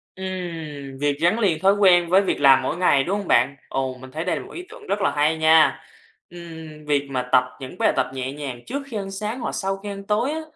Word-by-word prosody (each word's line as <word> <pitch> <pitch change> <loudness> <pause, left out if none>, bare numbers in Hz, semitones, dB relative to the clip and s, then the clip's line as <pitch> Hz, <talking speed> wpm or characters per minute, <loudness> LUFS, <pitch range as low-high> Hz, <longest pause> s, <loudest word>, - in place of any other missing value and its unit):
Ừm, 165 -7 -6
việc 145 -1 0
gắn 175 +7 +3
liền 180 -8 +1
thói 195 +2 +4
quen 180 -4 +4
với 190 +2 +5
việc 195 - -1
làm 135 -1 +7
mỗi 160 - -2
ngày, 145 -7 +3
đúng 195 +6 -1
hông 200 - -7
bạn? 130 +4 +3
Ồ, 130 -1 -2
mình 130 0 -11
thấy 160 +3 -4
đây 180 - 0
là - - -8
một - - -13
ý 355 - -7
tưởng 445 -2 -13
rất 205 - -1
là - - +2
hay 150 +2 +1
nha! 160 0 +4 0.5
Ừm, 160 -3 -11
việc 145 -1 0
mà 125 -1 -3
tập 125 - +6 0.2
những 130 -1 -9
bài - - +2
tập - - 0
nhẹ 130 0 -4
nhàng 135 -4 -7
trước 275 +2 -4
khi 225 -5 -5
ăn 195 -1 -5
sáng, 215 +5 -4
hoặc - - -3
sau 195 0 -2
khi 205 +1 -8
ăn 200 0 -7
tối 225 +7 +1
á, 320 +1 -3
170 Hz, 255 wpm, -22 LUFS, 140-195 Hz, 0.5 s, làm